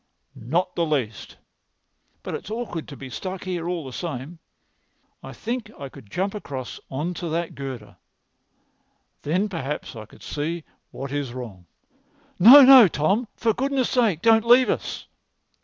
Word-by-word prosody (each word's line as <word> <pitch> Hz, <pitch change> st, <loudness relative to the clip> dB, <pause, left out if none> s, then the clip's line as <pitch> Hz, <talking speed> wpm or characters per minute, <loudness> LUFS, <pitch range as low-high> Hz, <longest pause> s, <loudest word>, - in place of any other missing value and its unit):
"Not 170 Hz, +10 st, -2 dB
the 170 Hz, -, 0 dB
least. 135 Hz, -9 st, -3 dB, 0.9 s
But -, -, -6 dB
it's 190 Hz, -, -6 dB
awkward 220 Hz, -8 st, -5 dB
to 140 Hz, -, -10 dB
be 140 Hz, -, -9 dB
stuck 185 Hz, +7 st, -6 dB
here 175 Hz, -2 st, -3 dB
all 175 Hz, -4 st, -3 dB
the 130 Hz, -, -8 dB
same. 160 Hz, +1 st, -6 dB, 0.8 s
I -, -, -9 dB
think 235 Hz, -1 st, -5 dB
I 140 Hz, -1 st, -7 dB
could 105 Hz, -, -15 dB
jump 190 Hz, -, -2 dB
across 135 Hz, -, -7 dB
on 150 Hz, +7 st, -3 dB
to 175 Hz, 0 st, -5 dB
that 170 Hz, +1 st, -2 dB
girder. 120 Hz, -9 st, -8 dB, 1.2 s
Then 180 Hz, +8 st, 0 dB
perhaps 150 Hz, -, -5 dB
I 110 Hz, -2 st, -9 dB
could -, -, -18 dB
see 160 Hz, +3 st, -4 dB, 0.3 s
what 135 Hz, +1 st, -7 dB
is 140 Hz, -4 st, -4 dB
wrong." 100 Hz, -9 st, -9 dB, 0.7 s
"No, 255 Hz, +10 st, +10 dB
no, 260 Hz, -4 st, +9 dB
Tom; 195 Hz, +10 st, 0 dB
for 225 Hz, -1 st, +1 dB
goodness' 270 Hz, 0 st, -1 dB
sake, 220 Hz, -10 st, +1 dB
don't 225 Hz, -1 st, +5 dB
leave 250 Hz, +2 st, +6 dB
us!" -, -, -4 dB
170 Hz, 155 wpm, -23 LUFS, 135-210 Hz, 1.2 s, No